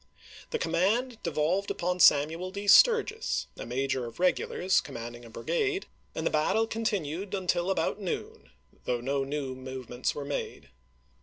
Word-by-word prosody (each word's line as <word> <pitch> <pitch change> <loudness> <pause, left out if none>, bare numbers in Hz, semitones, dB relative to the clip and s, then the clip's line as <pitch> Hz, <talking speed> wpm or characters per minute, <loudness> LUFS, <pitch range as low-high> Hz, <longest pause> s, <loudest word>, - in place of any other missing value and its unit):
The 465 - -1
command 220 - 0
devolved 170 +5 0
upon 180 +1 -1
Samuel 160 +4 +5
D. 200 +2 -6
Sturgis, 450 - +5
a - - -7
major 130 0 -1
of 115 - -11
regulars, 185 +1 +2
commanding 120 -3 -8
a - - -11
bri - - -9
gade, 410 -5 0 0.3
and - - -3
the - - +1
battle 155 +9 +2
continued 200 -4 -2
until 180 -1 0
about 195 +1 0
noon, 185 - -5 0.4
though 125 -1 0
no 135 +3 -1
new 135 -1 -3
movements 130 -1 -4
were 145 - -5
made. 140 - -5
170 Hz, 150 wpm, -29 LUFS, 135-200 Hz, 0.4 s, Samuel